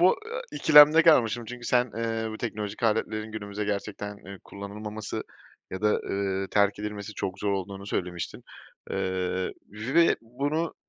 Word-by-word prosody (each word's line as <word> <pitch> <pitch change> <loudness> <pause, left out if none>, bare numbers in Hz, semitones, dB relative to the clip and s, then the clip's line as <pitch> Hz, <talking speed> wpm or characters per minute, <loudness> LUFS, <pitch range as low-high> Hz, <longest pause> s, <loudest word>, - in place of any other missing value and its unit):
bu, 180 +2 +6
eee, 475 +2 -4
ikilemde 150 +1 +8
kalmıştım. 120 -8 +4
Çünkü 120 +1 -8
sen, 125 -1 +2
eee, 115 -1 -2
bu 110 - -7
teknolojik 105 -2 -4
aletlerin 110 -1 0
günümüzde 100 -1 -4
gerçekten, 105 0 -4
eee, 100 -1 -11
kullanılmaması 105 +2 -6 0.5
ya 95 - -5
da, 105 - +4 0.2
ııı, 95 -1 -1
terk 100 -1 +3
edilmesi 105 -1 -5
çok 95 0 -4
zor 100 0 0
olduğunu 100 +1 -4
söylemiştin, 90 -3 -4 0.5
ııı, 95 0 -1 0.2
ve 135 +11 +3
bunu 145 +8 -2
105 Hz, 145 wpm, -27 LUFS, 100-120 Hz, 0.5 s, ikilemde